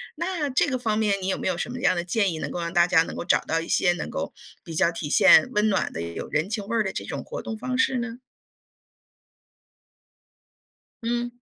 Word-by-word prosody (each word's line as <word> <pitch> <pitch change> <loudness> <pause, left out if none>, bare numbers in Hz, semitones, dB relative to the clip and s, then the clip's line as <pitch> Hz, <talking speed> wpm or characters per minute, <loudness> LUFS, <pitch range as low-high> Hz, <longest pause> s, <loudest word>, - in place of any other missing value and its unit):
那 335 -6 -2
这 260 - +2
个 260 -2 0
方 220 -4 -1
面 210 -2 +2
你 185 - -3
有 190 - 0
没 - - -3
有 185 -2 0
什 240 - -3
么 250 - -6
样 255 -6 +3
的 175 - -1
建 195 +2 +1
议， 160 - -5
能 - - -4
够 - - -4
让 170 0 -3
大 175 -2 +5
家 170 -2 +4
能 - - -7
够 - - -4
找 175 - +3
到 165 +1 -1
一 165 - -7
些， 175 -2 +3
能 175 - -5
够 - - -4 0.3
比 165 - -8
较 170 +1 +3
体 165 -3 -5
现 195 - +6
温 210 0 +3
暖 195 - 0
的， 80 - -4
也 85 0 -5
有 - - -5
人 155 +5 0
情 215 -2 -3
味 230 - -2
儿 225 - +3
的 190 - -2
这 - - -5
种 - - -5
活 - - -6
动 220 - -5
方 255 +3 -3
式 260 0 +2
呢？ 240 0 -5 2.8
嗯。 240 +1 -2
205 Hz, 260 characters per minute, -25 LUFS, 175-240 Hz, 2.8 s, 现